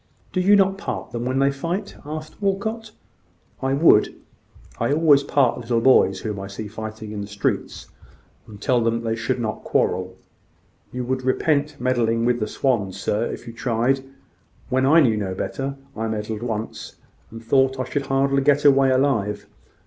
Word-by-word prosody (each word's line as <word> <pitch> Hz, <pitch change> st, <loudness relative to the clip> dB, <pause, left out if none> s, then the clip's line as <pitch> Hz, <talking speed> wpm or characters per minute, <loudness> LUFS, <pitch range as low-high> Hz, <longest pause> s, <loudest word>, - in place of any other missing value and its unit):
"Do 185 Hz, -, +1 dB
you 200 Hz, +3 st, +5 dB
not 195 Hz, -1 st, +3 dB
part -, -, -5 dB
them 120 Hz, 0 st, -4 dB
when 130 Hz, +1 st, -1 dB
they 140 Hz, +1 st, +3 dB
fight?" 170 Hz, +9 st, -4 dB
asked 155 Hz, +4 st, -8 dB
Walcot. 220 Hz, +3 st, -2 dB, 0.7 s
"I 135 Hz, 0 st, 0 dB
would. 140 Hz, -8 st, +4 dB, 0.6 s
I 115 Hz, -, 0 dB
always 150 Hz, -2 st, +5 dB
part 140 Hz, -3 st, +1 dB
little 120 Hz, -1 st, 0 dB
boys 130 Hz, +2 st, +4 dB
whom 105 Hz, -3 st, -4 dB
I 95 Hz, -, -6 dB
see 100 Hz, +2 st, -7 dB
fighting 110 Hz, 0 st, -7 dB
in 105 Hz, -1 st, -5 dB
the 100 Hz, -, -6 dB
streets, 100 Hz, -1 st, -3 dB, 0.6 s
and 105 Hz, -2 st, -12 dB
tell 120 Hz, +2 st, +1 dB
them 115 Hz, 0 st, 0 dB
they 115 Hz, -1 st, -1 dB
should 115 Hz, +3 st, -2 dB
not 110 Hz, -2 st, -3 dB
quarrel." 95 Hz, 0 st, 0 dB, 0.7 s
"You 125 Hz, 0 st, -4 dB
would 130 Hz, +1 st, -2 dB
repent 145 Hz, +3 st, 0 dB
meddling 115 Hz, -2 st, +1 dB
with 120 Hz, 0 st, +2 dB
the 105 Hz, -, -1 dB
swans, 100 Hz, -6 st, -1 dB
sir, 105 Hz, +3 st, 0 dB
if -, -, -7 dB
you 115 Hz, -, -8 dB
tried. 120 Hz, +3 st, 0 dB, 0.7 s
When 130 Hz, +1 st, +2 dB
I 160 Hz, +4 st, +6 dB
knew 115 Hz, -6 st, +3 dB
no 95 Hz, -3 st, -3 dB
better, 135 Hz, +7 st, -4 dB, 0.2 s
I 115 Hz, 0 st, -2 dB
meddled 110 Hz, 0 st, -4 dB
once, 110 Hz, -2 st, -5 dB, 0.3 s
and 115 Hz, -, -9 dB
I -, -, -24 dB
thought 135 Hz, +2 st, +2 dB
I -, -, 0 dB
should 135 Hz, +2 st, -3 dB
hardly 135 Hz, 0 st, +2 dB
get 145 Hz, +1 st, +2 dB
away 135 Hz, -1 st, +6 dB
alive. 130 Hz, -6 st, +1 dB
125 Hz, 180 wpm, -22 LUFS, 110-140 Hz, 0.7 s, I